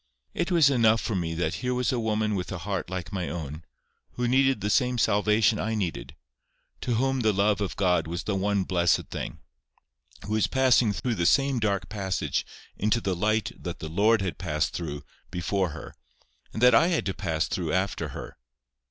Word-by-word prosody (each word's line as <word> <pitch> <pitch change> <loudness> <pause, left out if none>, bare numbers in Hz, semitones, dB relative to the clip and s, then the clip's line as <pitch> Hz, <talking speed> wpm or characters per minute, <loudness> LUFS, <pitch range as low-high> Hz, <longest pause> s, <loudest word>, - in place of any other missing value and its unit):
It - - -1
was 165 -6 +5
enough 115 -3 +4
for 110 - -3
me 85 -4 -2
that 85 - -1
here 125 0 -1
was 125 0 0
a 125 - -1
woman 110 -1 0
with 90 -3 -3
a 95 - -3
heart 95 0 -4
like 95 +1 -5
my 90 -5 -2
own; 80 -1 -6 0.5
who 125 0 -1
needed 135 +1 +3
the 105 - -1
same 125 +2 +2
salvation 105 0 +3
I 110 0 -1
needed; 80 - -4 0.7
to 120 - -1
whom 135 +3 +1
the 110 -3 +3
love 105 +1 +1
of 100 - -2
God 90 -4 +1
was 85 +1 -4
the 105 - -2
one 100 0 +1
blessed 90 -3 +1
thing; - - -5 0.9
who 105 - -3
was 110 - +2
passing 130 -4 +3
through 120 +4 -2
the 85 -5 +1
same 135 +2 +3
dark 100 -3 0
passage 95 -3 -2 0.3
into 110 +3 +1
the 95 -5 -1
light 110 +4 0
that - - -4
the 80 - -7
Lord 105 +5 +3
had 90 -6 -4
passed 80 -3 -1
through 75 -4 -5 0.3
before 90 +1 -1
her, 80 - -9 0.6
that 125 +3 +4
I 165 - +6
had 175 -3 0
to 95 - -1
pass 80 -6 -1
through 85 -4 -2
after 95 +2 -1
her. - - -9
100 Hz, 195 wpm, -26 LUFS, 90-115 Hz, 0.9 s, I